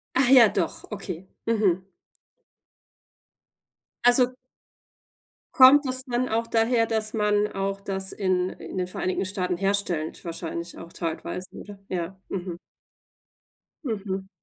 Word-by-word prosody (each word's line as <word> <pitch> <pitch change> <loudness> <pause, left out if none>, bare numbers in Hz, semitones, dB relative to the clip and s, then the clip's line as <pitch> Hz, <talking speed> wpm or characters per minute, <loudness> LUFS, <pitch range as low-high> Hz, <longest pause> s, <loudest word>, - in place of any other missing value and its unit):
Ach 260 -1 +4
ja, 250 -4 +8
doch, 180 -5 -2
okay. 190 -4 -6 0.2
Mhm. 195 -5 +1 2.2
Also 245 +1 +5 1.2
kommt 270 +3 +8
das 255 0 -3
dann 250 0 -1
auch 230 +1 0
daher, 230 0 +2
dass 220 -1 -1
man 210 -1 +2
auch 195 0 -2
das 190 -1 -1
in 185 -2 0
in - - -8
den 180 - 0
Vereinigten 185 +1 -2
Staaten 185 -2 -2
herstellt 195 -5 0
wahrscheinlich 170 0 -5
auch 170 - -10
teilweise, 170 +2 -4
oder? 205 -1 -10
Ja, 180 +1 -3
mhm. 180 -2 -4 1.3
Mhm. 195 -5 -3
195 Hz, 115 wpm, -25 LUFS, 180-230 Hz, 2.2 s, ja